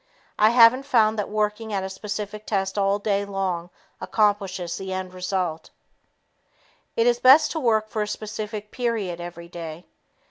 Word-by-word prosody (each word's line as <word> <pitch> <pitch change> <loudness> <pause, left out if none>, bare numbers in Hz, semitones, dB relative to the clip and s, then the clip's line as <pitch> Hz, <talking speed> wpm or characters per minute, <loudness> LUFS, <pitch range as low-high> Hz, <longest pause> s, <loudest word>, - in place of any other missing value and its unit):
I 215 - +6
haven't 240 +3 +6
found 220 -4 +3
that 205 - -2
working 215 +1 -1
at 195 -1 -1
a - - -3
specific 210 +1 -6
test 195 -2 -1
all 200 0 +2
day 200 -1 0
long 190 -3 -3 0.3
accomplishes 195 -5 0
the 190 0 -6
end 185 -1 -4
result. 180 -3 -3 1.3
It 230 - +2
is 240 0 +3
best 270 +5 +7
to 320 - -2
work 220 -5 +2
for 215 0 -3
a 210 - -1
specific 215 0 -6
period 215 -8 -2
every 170 0 -8
day. 170 -1 -8
205 Hz, 155 wpm, -24 LUFS, 185-220 Hz, 1.3 s, best